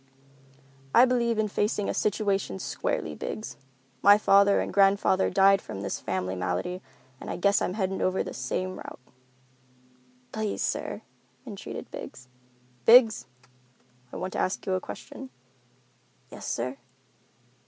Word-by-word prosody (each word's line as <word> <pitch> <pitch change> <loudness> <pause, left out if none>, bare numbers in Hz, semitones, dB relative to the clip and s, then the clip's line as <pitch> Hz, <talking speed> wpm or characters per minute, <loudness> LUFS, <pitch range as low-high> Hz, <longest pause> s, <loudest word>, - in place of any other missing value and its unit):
"I 245 - +8
believe 235 -3 +1
in 215 0 +1
facing 205 0 -1
a - - -1
situation 200 - -1
squarely, 80 -4 -3
Biggs. 215 - -6 0.5
My 205 +1 +7
father 200 -1 +4
and - - -3
grandfather 195 -1 +3
died 195 0 +4
from 95 - -7
this 100 -1 -3
family 95 0 -3
malady, 90 - -3 0.4
and - - -8
I - - -3
guess 200 +3 +2
I'm 180 - -1
headed 190 -2 -2
over 185 0 +1
the - - -7
same 185 +9 -3
route." - - -9 1.3
"Please, 215 -2 -2
sir," - - -3 0.4
entreated 205 -6 -8
Biggs. 125 0 -9 0.5
"Biggs, 230 -2 +6 0.8
I - - -9
want 185 - -4
to - - -3
ask 185 - -1
you 190 - -1
a 185 - 0
question." 265 +7 -9 1.0
"Yes, - - -8
sir?" 125 +3 -3
195 Hz, 135 wpm, -27 LUFS, 180-210 Hz, 1.3 s, I